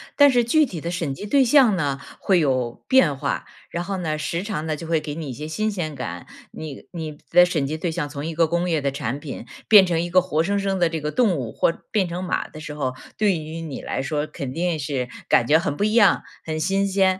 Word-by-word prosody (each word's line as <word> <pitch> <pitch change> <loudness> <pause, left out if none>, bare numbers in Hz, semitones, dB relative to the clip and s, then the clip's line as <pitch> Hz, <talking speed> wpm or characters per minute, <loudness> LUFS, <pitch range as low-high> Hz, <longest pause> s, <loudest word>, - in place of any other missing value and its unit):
但 285 -1 +7
是 245 -2 +3
具 305 +6 +4
体 185 - -6
的 170 - -4
审 170 -5 -2
计 170 - -7
对 270 +6 +4
象 250 -4 +5
呢 140 -5 -1 0.2
会 190 -3 +3
有 130 -6 0
变 185 - +4
化， - - -2 0.2
然 170 - -3
后 195 +1 -3
呢， 155 -4 -2
时 155 +3 -2
常 195 -6 -4
呢， 155 -1 -1
就 165 +1 -8
会 165 -2 +1
给 145 -1 -5
你 160 -2 -5
一 - - -4
些 150 +5 -7
新 215 +6 -1
鲜 175 -7 -3
感。 90 -10 -6 0.2
你 155 -3 -8
你 160 -3 -5
的 180 0 +7
审 160 -6 -1
计 155 +3 -3
对 165 +1 -2
象 160 -3 -2
从 145 0 -6
一 165 - -3
个 165 0 +3
工 175 +2 0
业 160 -2 +2
的 140 -1 0
产 135 -1 -3
品， 145 -2 -7 0.2
变 205 -3 +8
成 170 -2 0
一 175 - -3
个 185 +1 +5
活 170 -4 0
生 200 +5 0
生 195 -1 -1
的 175 - +4
这 165 -1 -3
个 150 +1 -2
动 225 -8 +3
物 120 -5 -4
或 165 - +1 0.2
变 195 -4 +2
成 175 +2 -4
马 180 - -1
的 155 - -11
时 150 -1 -6
候， 130 -4 -2 0.2
对 205 -5 +2
于 155 +1 -6
你 155 -5 -6
来 - - -3
说 145 +2 -1
肯 140 -4 -6
定 170 0 -1
是 135 -4 -2 0.2
感 120 - +4
觉 150 +6 +5
很 170 -5 -2
不 200 - -1
一 215 +1 +1
样， 220 -4 +5 0.2
很 155 -1 -3
新 195 +5 +1
鲜。 190 -1 +2
165 Hz, 280 characters per minute, -23 LUFS, 150-190 Hz, 0.2 s, 变